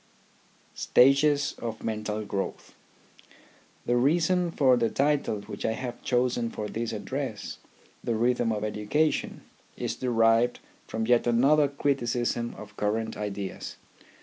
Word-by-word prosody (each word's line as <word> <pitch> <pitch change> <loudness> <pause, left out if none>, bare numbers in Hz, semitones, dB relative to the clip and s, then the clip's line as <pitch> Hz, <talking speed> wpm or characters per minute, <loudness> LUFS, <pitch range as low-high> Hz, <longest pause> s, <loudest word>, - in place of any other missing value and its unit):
STAGES 140 +2 +4
OF 115 -2 -5
MENTAL 110 -1 -3
GROWTH 100 -1 -4 1.1
The 120 - +2
reason 170 +6 +2
for 135 -6 +4
the 115 -2 +1
title 140 -7 +1
which 105 +1 -8
I 110 - +1
have 120 0 -6
chosen 120 -2 +1
for 105 -2 -5
this 115 +2 -3
address, - - -4 0.4
the 115 - 0
Rhythm 120 0 +1
of 105 -1 -2
Education, 110 +9 0 0.4
is - - -2
derived 115 -1 +2 0.3
from 110 0 -2
yet 120 +1 +3
another 140 +5 +4
criticism 120 -4 -1
of 105 -1 -11
current 110 +2 -1
ideas. 100 -2 -5
120 Hz, 120 wpm, -27 LUFS, 110-135 Hz, 1.1 s, STAGES